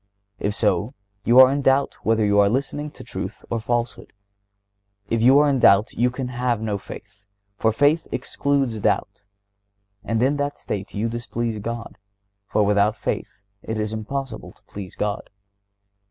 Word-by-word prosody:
If 105 +1 -1
so, 105 +3 0 0.3
you 120 +2 +6
are 130 0 +9
in 140 +1 0
doubt 135 +1 +1
whether 110 -1 +2
you 100 0 +3
are 100 0 +5
listening 140 +5 -2
to - - -12
truth - - -6
or 115 - 0
falsehood. 120 +1 -3 1.0
If 115 -1 +1
you 130 +4 +6
are 150 0 +5
in 140 -2 +2
doubt 100 0 +5
you 125 +2 +2
can 125 0 -5
have 125 -2 -1
no 105 -2 -2
faith, 100 0 -12 0.3
for 110 +2 +2
faith 145 +7 +2
excludes 135 -6 -1
doubt, 100 - -1 0.8
and 115 +1 0
in 140 +3 +2
that 145 0 -2
state 100 -1 -5
you 105 +3 0
displease 115 -1 -3
God, 115 +2 -6 0.5
for 105 - +2
"without 105 +1 +3
faith - - -3 0.3
it 110 -1 -4
is 105 0 -2
impossible 115 +2 -5
to - - -26
please 100 -3 -9
God." 105 -1 -3
115 Hz, 165 wpm, -23 LUFS, 105-130 Hz, 1.0 s, are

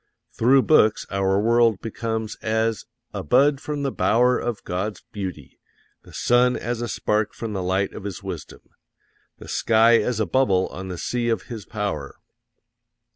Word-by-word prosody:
Through 130 +3 +4
books 110 -9 +4
our 95 0 +1
world 115 -1 +3
becomes 110 -1 -4
as 110 -1 -1 0.3
"a - - -3
bud 135 - +3
from 145 -1 -4
the 135 - 0
bower 125 +2 +2
of 120 -3 -4
God's 95 +3 -4
beauty; 95 -9 -7 0.4
the - - -17
sun 125 +1 +3
as 120 0 -3
a 120 - -2
spark 105 0 -1
from 115 -2 -5
the 95 - -2
light 95 +2 0
of - - -8
His 100 -5 -6
wisdom; - - -7 0.8
the - - -12
sky 115 +1 +4
as 125 -3 -1
a 110 - +2
bubble 100 -9 +2
on 95 +2 -7
the 90 -1 -5
sea 120 +6 -2
of 115 -5 0
His 115 -5 -8
Power." 105 -2 -4
110 Hz, 165 wpm, -23 LUFS, 100-120 Hz, 0.8 s, Through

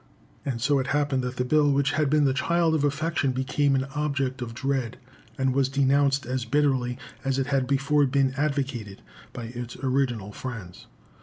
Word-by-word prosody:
And 130 -4 -3
so 140 +3 +2
it 130 - -2
happened 145 -2 +1
that 125 0 -4
the 125 - 0
bill 145 +2 +3
which 140 0 +2
had 150 -1 +1
been 150 0 +3
the 135 - +3
child 165 +3 +2
of 155 -2 +1
affection 145 -1 0
became 135 +2 +1
an 130 - +1
object 140 -3 -1
of 115 -1 -5
dread, 130 -2 -2 0.4
and 130 -1 +1
was 135 0 +2
denounced 140 0 +2
as 130 +1 -2
bitterly 130 -1 +1 0.3
as 135 -1 0
it 135 - +1
had 135 -2 0
before 140 +1 +2
been 135 0 +2
advocated 135 -8 -2 0.3
by 120 - -7
its 120 -1 -6
original 130 -6 -1
friends. 105 -7 -8
135 Hz, 180 wpm, -26 LUFS, 125-145 Hz, 0.4 s, bill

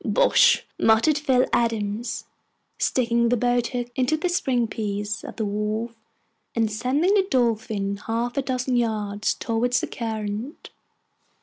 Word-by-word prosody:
"Bosh!" - - +4
muttered 230 +7 +4
Phil 260 -4 +3
Adams, 230 -1 -1 0.5
sticking 235 -2 +2
the 245 - +2
boat 245 0 +1
hook 245 -1 -4
into 260 +4 +1
the 355 +3 -1
string 260 -9 +1
piece 210 -1 -3
of - - -8
the 220 - -2
wharf, 210 +3 -2 0.6
and 225 -2 +1
sending 265 - +1
the 390 -2 +3
Dolphin 220 -5 0
half 230 +3 -3
a 275 - +1
dozen 255 -1 -1
yards 210 -3 -1
towards 245 +2 0
the - - -2
current. 220 - -5
235 Hz, 135 wpm, -24 LUFS, 215-250 Hz, 0.6 s, Bosh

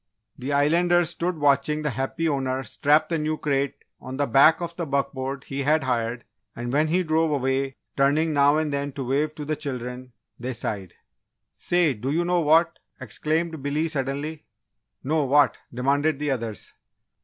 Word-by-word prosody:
The 130 +3 -5
Islanders 170 +4 +3
stood 175 0 -2
watching 145 +1 +2
the 150 - 0
happy 135 +6 -2
owner 135 -3 -1
strap 150 +3 +2
the 165 -2 0
new 155 +1 -1
crate 140 -2 -1 0.2
on 130 +1 -7
the 145 - +1
back 140 +5 +5
of 170 -1 -5
the 170 -2 -4
buckboard 135 -1 -2
he 140 0 -4
had 150 +2 +2
hired, 120 -2 -2 0.3
and 120 +1 -4
when 155 +2 +3
he 180 +4 +1
drove 160 -2 +1
way, 135 +1 -1 0.2
turning 150 +3 +2
now 145 +1 +4
and 155 -2 -1
then 140 0 -2
to 135 -1 -5
wave 150 +4 0
to 150 - -6
the 155 +1 -1
children, 125 -3 -6 0.3
they 125 +2 -4
sighed. 100 -5 -4 0.6
"Say, 175 -5 +1
do 125 +3 -5
you 165 +4 +1
know 175 0 +2
what?" 160 +2 +3 0.2
exclaimed 155 +7 -2
Billy, 145 +3 -1
suddenly. 145 +1 -4 0.6
"No, 150 +2 +1
what?" 140 -3 +3
demanded 140 +4 +1
the 145 0 -1
others. 115 -5 -4
145 Hz, 170 wpm, -24 LUFS, 135-155 Hz, 0.6 s, back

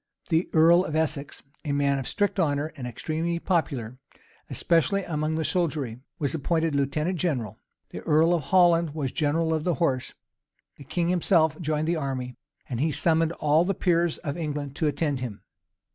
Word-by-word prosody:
The 165 +2 +1
earl 170 +3 +6
of 155 -4 -4
Essex, 155 -3 -2 0.2
a 145 -3 -2
man 140 -1 +1
of 130 - -5
strict 205 -1 0
honor, 150 -2 0
and 125 -3 -6
extremely 160 +7 -2
popular, 135 - -1 0.5
especially 175 +4 +1
among 155 -2 -2
the 160 - -1
soldiery, 145 -9 -1 0.2
was 145 -6 -1
appointed 160 +1 0
lieutenant 150 +6 0
general: 125 - -2 0.3
the - - -6
earl 160 +3 +3
of 165 -6 -1
Holland 170 -1 +4
was 140 -5 -2
general 160 +1 0
of 155 -1 -1
the 175 -1 +1
horse. 135 -7 -1 0.6
The 140 - -12
king 170 +4 -1
himself 170 -3 +2
joined 155 -1 -1
the 170 0 +1
army, 130 -4 -3 0.3
and 120 -3 -4
he 155 +3 +1
summoned 165 +2 +2
all 155 +1 +3
the 195 +2 -1
peers 170 -2 +1
of 145 -2 -5
England 145 -4 -4
to 155 - +1
attend 145 -1 -1
him. 120 -5 -6
155 Hz, 175 wpm, -26 LUFS, 140-170 Hz, 0.6 s, earl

